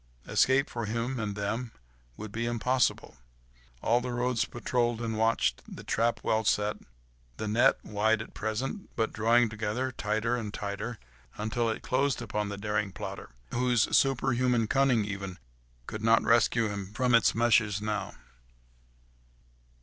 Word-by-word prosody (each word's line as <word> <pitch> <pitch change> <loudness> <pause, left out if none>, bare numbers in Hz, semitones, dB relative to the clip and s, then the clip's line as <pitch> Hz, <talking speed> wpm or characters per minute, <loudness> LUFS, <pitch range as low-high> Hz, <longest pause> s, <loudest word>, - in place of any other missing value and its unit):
Escape 135 +3 +3
for 120 -2 -4
him 115 +4 -2
and 105 -2 -3
them 110 +4 -3 0.5
would 110 -1 -7
be 115 +3 -2
impossible. 120 +1 0 0.7
All 120 +2 +3
the 125 0 -4
roads 120 0 0
patrolled 120 -1 -1
and 115 -1 -3
watched, 115 +1 +1
the - - -9
trap 115 +1 0
well 110 0 +1
set, 105 0 +1 0.6
the 110 - -3
net, 110 +3 +4
wide 110 +1 +1
at - - -15
present, 120 - -3
but 110 -1 -1
drawing 115 +2 +4
together 110 +4 -2
tighter 110 +1 -1
and 110 -4 -4
tighter, 105 +4 -4 0.4
until 110 +2 -1
it 110 - -4
closed 135 +1 +1
upon 105 -3 -3
the 100 - -5
daring 105 0 -1
plotter, 100 -1 -7 0.2
whose 125 -2 +2
superhuman 125 -3 +2
cunning 125 -2 +2
even 100 -2 -5 0.5
could 110 - -6
not 115 +1 +4
rescue 115 0 +3
him 100 -2 -5
from 125 +2 +1
its 115 -2 +5
meshes 110 -3 +3
now. 105 -2 -3
115 Hz, 145 wpm, -29 LUFS, 105-120 Hz, 0.7 s, its